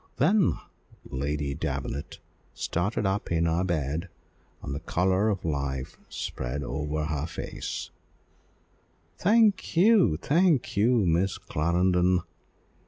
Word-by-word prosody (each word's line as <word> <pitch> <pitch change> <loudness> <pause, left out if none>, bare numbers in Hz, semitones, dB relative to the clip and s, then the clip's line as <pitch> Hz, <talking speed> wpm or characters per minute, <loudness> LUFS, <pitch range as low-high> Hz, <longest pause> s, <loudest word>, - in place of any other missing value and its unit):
Then 190 +6 +4 0.5
Lady 70 +1 -2
Davenant 70 -2 -4 0.4
started 100 +5 -1
up 95 0 -1
in 85 0 +2
her 85 +2 +1
bed, 85 0 -2 0.5
and - - -4
the 70 - -3
colour 95 +5 +1
of 95 -5 -2
life 70 -4 -3
spread 65 +4 -4
over 75 +3 -2
her 75 0 -2
face 85 - -5 1.3
"Thank 210 -4 +3
you, 195 - +5
thank 160 - +2
you, 110 +1 +3
Miss 90 +3 +1
Clarendon! 90 +3 +1
85 Hz, 105 wpm, -27 LUFS, 75-105 Hz, 1.3 s, you